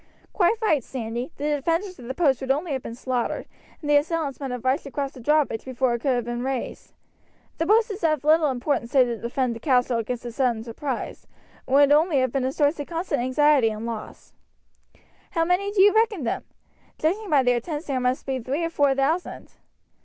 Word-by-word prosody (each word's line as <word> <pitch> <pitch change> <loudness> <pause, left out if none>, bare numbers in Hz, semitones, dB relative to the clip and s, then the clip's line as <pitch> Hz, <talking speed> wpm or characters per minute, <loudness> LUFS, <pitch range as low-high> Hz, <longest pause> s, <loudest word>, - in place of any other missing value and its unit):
"Quite 395 +4 +3
right, 310 - +2
Sandy! 240 +2 -5
The 295 +1 0
defenders 335 +5 -2
of 240 - -10
the 260 - -4
post 275 -6 +2
would 265 - -5
only 300 +5 0
have 265 -2 -2
been 230 - -7
slaughtered, 250 -1 -2 0.4
and 300 - -6
the 295 0 +5
assailants 300 -2 -1
might 275 -2 -4
have 250 0 -5
rushed 265 +2 +1
across 275 0 -3
the 265 - -13
drawbridge 290 -3 +1
before 260 -1 0
it 235 - -2
could 270 -2 +1
have 240 -2 -2
been 240 0 -3
raised. 265 -1 -4 0.7
The 330 - 0
post 435 +2 +4
is 395 -1 -7
of 310 -4 +1
little 310 0 +4
importance 255 -1 -1
save 265 -2 +5
to 235 -1 -3
defend 240 +2 -1
the - - -8
castle 250 -2 +2
against 240 +2 -4
a 240 - -4
sudden 235 -3 0
surprise, 245 +3 -5 0.4
and 265 - +1
would 285 0 +6
only 305 +1 +4
have 255 -2 +1
been 265 -1 -1
a 260 - 0
source 290 +2 +1
of 290 - -4
constant 335 -5 -2
anxiety 260 -1 +3
and 215 +1 -5
loss. 230 -2 -7 1.0
How 330 -3 +2
many 365 +4 +1
do 395 -2 +4
you 410 - +6
reckon 435 - +2
them? 230 - -2 0.5
Judging 390 +7 -1
by 285 -3 +4
their 245 -1 +2
tents 300 +4 -5
there 270 -3 -1
must 250 +1 -1
be 265 -1 -2
three 270 +7 -2
or 330 - -2
four 285 -4 +2
thousand." 305 +6 -1
275 Hz, 215 wpm, -24 LUFS, 250-315 Hz, 1.0 s, would